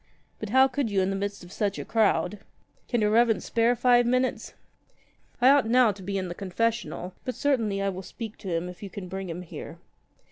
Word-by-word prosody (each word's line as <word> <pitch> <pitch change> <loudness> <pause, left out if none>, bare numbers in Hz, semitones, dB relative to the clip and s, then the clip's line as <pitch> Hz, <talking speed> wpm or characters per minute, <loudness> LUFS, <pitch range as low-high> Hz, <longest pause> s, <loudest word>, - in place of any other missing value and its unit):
But 215 - -5
how 260 +4 +6
could 270 +1 -1
40 210 - -6
you 190 - +4
in 190 +1 0
the - - -1
midst 200 0 -4
of 175 - -13
such 200 -1 -1
a - - -5
crowd! 215 -2 +1 0.5
Can 240 -3 0
your 210 0 +2
Reverence 230 0 +3
spare 235 +1 +2
five 245 0 +4
minutes?'' 255 +1 0 0.8
"I 250 +2 +6
ought 280 -4 +5
now 245 -2 +5
to 195 -1 -11
be 195 +1 -3
in 185 -1 -2
the 175 - -5
confessional; 200 0 -2
but 255 - -4
certainly 225 -9 0
I 195 - +1
will 190 -1 -5
speak 220 +3 -8
to 195 - -9
him 170 +1 -1
if 180 0 -10
you 200 - -6
can 185 0 -7
bring 190 0 -5
him 170 +2 -5
here." 175 - -9
210 Hz, 225 wpm, -27 LUFS, 195-240 Hz, 0.8 s, how